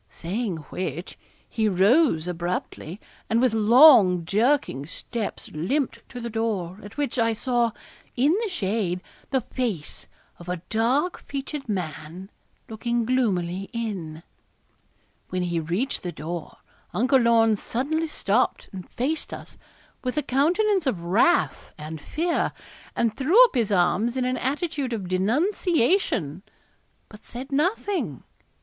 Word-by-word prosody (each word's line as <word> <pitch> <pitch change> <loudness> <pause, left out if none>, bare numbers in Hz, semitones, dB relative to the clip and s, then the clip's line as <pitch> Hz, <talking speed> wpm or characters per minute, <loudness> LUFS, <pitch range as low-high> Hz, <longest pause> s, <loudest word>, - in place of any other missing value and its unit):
Saying 195 +1 -3
which, 175 -1 -4 0.3
he 220 -1 0
rose 195 - +3
abruptly, 175 0 -4 0.3
and 225 - +3
with 250 -2 +3
long 220 - +7
jerking 210 - +1
steps 220 +5 -5
limped 255 - -1
to 245 - -7
the 235 - -4
door, 215 -5 -2
at 205 +4 -12
which, 280 -4 -1
I 230 0 +3
saw, 240 +1 +1 0.5
in 285 +7 +3
the 450 - -1
shade, 195 - -1 0.3
the 265 -1 +1
face 225 - -4 0.3
of 175 0 -10
a 180 -1 -4
dark 255 +10 +1
featured 275 -1 -6
man, 180 0 -5 0.4
looking 235 +1 -1
gloomily 195 -7 0
in. 185 -9 -4 1.1
When 185 -1 -1
he 170 -1 -1
reached 175 - -2
the 175 - -4
door 160 +1 -6 0.4
Uncle 260 +4 +4
Lorne 230 -2 +4
suddenly 295 +10 -2
stopped 235 -5 0
and 185 -2 -8
faced 290 +6 -2
us, - - -9 0.5
with 255 +3 -3
a 300 - +1
countenance 345 +7 +2
of 185 -10 -1
wrath 215 - +2
and 155 0 -7
fear, 335 - -1 0.4
and 225 -2 +1
threw 315 - +3
up 485 - -4
his 230 -6 0
arms 200 +6 +2
in 255 - 0
an 255 0 0
attitude 285 -1 -2
of 200 -5 -4
denunciation, 235 - +1 0.7
but 210 0 -15
said 260 +4 -8
nothing. 305 - -1
225 Hz, 130 wpm, -25 LUFS, 180-270 Hz, 1.1 s, long